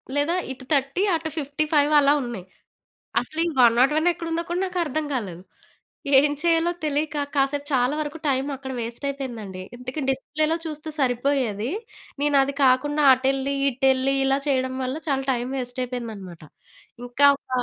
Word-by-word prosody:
లేదా 290 +5 +1 0.2
ఇటు 260 0 -9
30 275 +6 +1
అటు 320 0 -3
55 300 +1 +1
అలా 285 0 +4
ఉన్నాయి. 230 -7 -6 0.8
అసలు 315 - -5
ఈ - - +1
101 265 +8 +4
ఎక్కడ 335 - -8
ఉందో 335 - 0
కూడా 350 +2 -1
నాకర్థం 330 -5 -2
కాలేదు. 185 -8 -4 0.8
ఏం 290 +1 +2
చేయాలో 335 0 +2
తెలియక, 300 +1 -1 0.2
కాసేపు 280 +1 +1
చాలా 250 +2 +2
వరకు 300 +1 -4
టైమ్ 270 0 +1
అక్కడ 265 0 -7
వేస్ట్ 235 +4 -5
అయిపోయిందండి. 230 -9 -6 0.2
ఇంతకి 255 +4 -6
డిస్‌ప్లే‌లో 310 +4 0
చూస్తే 310 0 -6
సరిపోయేది. 245 -3 0 0.5
నేను 290 -1 +2
అది 275 +1 -1
కాకుండా 290 +3 +3
అటెళ్ళి, 270 +1 0 0.2
ఇటెళ్లి 265 +1 +2
ఇలా 270 +1 +2
చేయడం 260 -1 0
వల్ల 255 +3 -2
చాలా 270 -1 0
టైమ్ 245 +1 -2
వేస్ట్ 245 +1 -4
అయిపోయిందనమాట. 220 -9 -7 0.6
ఇంకా 255 +4 +4
ఒక - - -49
275 Hz, 145 wpm, -24 LUFS, 250-300 Hz, 0.8 s, అలా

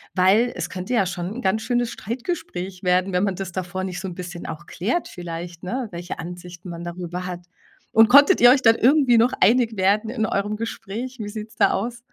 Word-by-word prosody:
weil 200 +6 +4
es 175 -1 -4
könnte 185 +6 -5
ja 220 -5 +3
schon 180 +2 -4
'n 250 - -5
ganz 205 +2 +1
schönes 240 0 0
Streitgespräch 195 - -5
werden, 180 +1 +2
wenn 180 +1 +1
man 195 -2 -1
das 190 0 -5
davor 185 +1 -4
nicht 185 -1 -4
so 190 - -5
'n 180 - -7
bisschen 175 -1 -7
auch 165 +2 -7
klärt 225 - -2
vielleicht, 170 -1 -7
ne, 240 +5 -3
welche 175 +1 -6
Ansichten 175 +1 -8
man 170 0 -7
darüber 175 +1 -5
hat. 175 -1 -7 0.4
Und 225 0 +6
konntet 285 - +7
ihr 245 0 +8
euch 265 +1 +4
dann 225 -2 +6
irgendwie 265 -2 +4
noch 235 +3 +3
einig 230 +2 +4
werden 205 +3 +2
in 225 -2 -1
eurem 205 0 -1
Gespräch? 230 +3 -5
Wie 210 - -4
sieht's 215 0 -8
da 210 - +4
aus? 235 +4 -2
195 Hz, 215 wpm, -23 LUFS, 180-230 Hz, 0.4 s, ihr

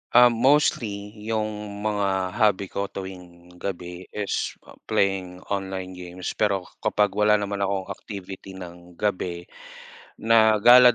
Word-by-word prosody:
Ah, 125 0 +9
mostly, 115 -5 +2 0.2
yung 105 -2 -3
mga 100 -3 0
hobby 105 -3 +2
ko 100 0 -2
tuwing 90 -3 -9
gabi 90 -1 -5
is 105 -1 -2 0.3
playing 95 -2 0
online 95 -2 -3
games. 90 0 -6
Pero 100 -3 +1 0.2
kapag 105 -1 +2
wala 105 +1 +4
naman 100 -1 -2
akong 100 0 -1
activity 95 -1 -8
ng 90 -1 -11
gabi, 90 -3 -2 0.7
na 110 -1 +5
gala 125 +1 +9
100 Hz, 120 wpm, -25 LUFS, 95-105 Hz, 0.7 s, Ah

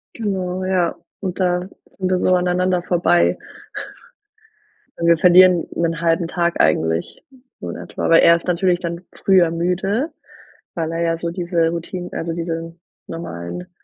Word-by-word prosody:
Genau 185 -4 -3
ja, 185 -2 +1 0.2
und 185 -2 -4
da 180 -1 0 0.2
sind 185 -1 -3
wir 185 -1 +1
so 185 - +2
aneinander 180 0 +1
vorbei. 175 -1 +2 1.6
Und 170 - -1
wir 170 0 +5
verlieren 180 0 +6
'nen 165 -1 -1
1/2 165 0 +1
Tag 170 0 -1
eigentlich 80 +2 0 0.4
so - - -6
in - - -5
etwa, - - -4
weil 165 - +7
er 170 - +7
ist 170 - -6
natürlich 180 0 +1
dann 170 -1 -5 0.2
früher 185 -4 +5
müde 190 - -1 0.7
weil 165 -1 -2
er 165 +1 -2
ja 165 0 +1
so 170 0 -3
diese 170 -1 0
Routin 170 +2 -5
also 165 0 -3
diesen 165 0 -5 0.3
normalen 165 - -7
175 Hz, 150 wpm, -20 LUFS, 165-180 Hz, 1.6 s, weil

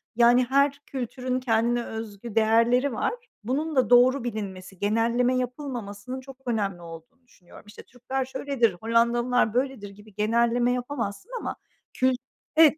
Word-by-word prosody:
yani, 245 +1 +5
her 280 +2 +2
kültürün 255 0 -3
kendine 235 0 +1
özgü 220 0 -7
değerleri 230 +4 +3
var. 240 - -1 0.3
Bunun 295 +7 -2
da 260 -2 +3
doğru 250 +1 +5
bilinmesi, 195 -5 -6
genelleme 235 +4 +2
yapılmamasının 250 -3 -5
çok 270 0 -12
önemli 200 -7 -1
olduğunu 165 +9 -12
düşünüyorum. 180 -6 -17
İşte, 210 - -12
"Türkler 255 +2 -4
şöyledir, 265 -5 0
Hollandalılar 235 0 +2
böyledir." 255 -5 -1
gibi 205 +1 -16
genelleme 235 +3 +2
yapamazsın 250 - -4
ama - - -4 0.4
kült 255 -1 +2 0.4
Evet, 315 -1 +6
240 Hz, 130 wpm, -26 LUFS, 220-255 Hz, 0.4 s, Evet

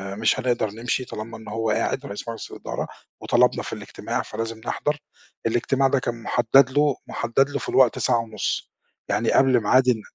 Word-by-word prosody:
مش 110 +4 +2
هنقدر 120 -4 0
نمشي 120 +3 -2
طالما 115 +1 -7
إن 110 - -13
هو 110 +1 -2
قاعد 135 +5 0
رئيس 100 +3 -7
مجلس 115 - -7
الإدارة - - -5 0.3
وطلبنا - - +3
في - - -6
الاجتماع، - - -4
فلازم 115 0 -5
نحضر، 150 0 -1 0.5
الاجتماع 130 +4 +2
ده 135 0 +2
كان 120 -2 -4
مُحدد 125 +4 +4
له 145 -1 +3
مُحدد 135 +4 +1
له 140 - -2
في - - -5
الوقت 130 -3 +4
ساعة 120 -2 +2
ونُص، 115 -1 -3 0.4
يعني - - +1
قبل 130 -3 +4
ميعاد 130 +4 +4
ال 115 -4 +3
120 Hz, 175 wpm, -24 LUFS, 115-130 Hz, 0.5 s, مُحدد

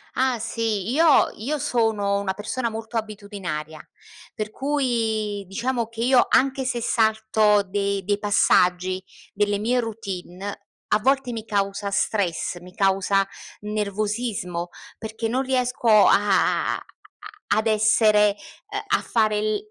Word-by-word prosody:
Ah 260 -2 +1
sì, 225 -2 -2
io 315 0 +4
io 280 +8 -2
sono 215 -6 0
una 190 -1 -2
persona 235 +3 -3
molto 225 +1 -5
abitudinaria, 200 -8 -5 0.5
per 215 0 -4
cui 225 -8 -1
diciamo 235 +3 -2
che 230 0 -8
io 255 0 +4
anche 265 0 +2
se 240 -2 -2
salto 220 -2 +2
dei 200 0 -2
dei 205 +1 0
passaggi 185 -2 +2 0.3
delle 205 0 +1
mie 240 +4 +1
routine, 200 -3 -6 0.2
a 210 - +2
volte 270 +1 +1
mi 225 -1 -6
causa 200 -1 -1
stress, 185 -3 -1
mi 180 +1 -14
causa 195 0 +2 0.3
nervosismo, 210 -3 -3 0.3
perché 220 +1 -4
non 255 +4 0
riesco 250 -2 -1
a 205 -2 +4
a - - -5 0.8
ad 220 +1 +1
essere, 215 -1 +4 0.4
ehm, - - -3 0.2
a - - -6
fare 215 -2 +1
l 215 0 0
215 Hz, 130 wpm, -23 LUFS, 200-230 Hz, 0.8 s, io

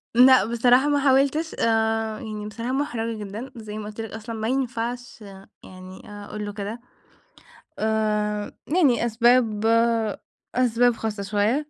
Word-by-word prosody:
لأ، 255 -3 +7
بصراحة 245 +4 +3
ما 290 -1 +2
حاولْتش، 280 +4 +2
آآ 225 -1 +1
يعني 210 -1 -6
بصراحة 230 +4 -5
محرَجة 230 -5 -2
جدًا، 215 +6 -7
زي 215 -2 -8
ما 210 - -6
قلت 215 +1 -7
لك 225 - -7
أصلًا 220 +1 -7
ما 220 0 -3
ينفعش 245 -2 -3
آآ 195 -1 -13
يعني 185 0 -12
أقول 205 +1 -7
له 205 - -6
كده، 210 +3 -5 1.0
آآ 210 -1 -1 0.2
يعني 260 -10 +3
أسباب 230 -2 +2 0.9
أسباب 245 -1 +3
خاصة 210 -3 -4
شوية. 215 +9 0
225 Hz, 140 wpm, -24 LUFS, 210-245 Hz, 1.0 s, لأ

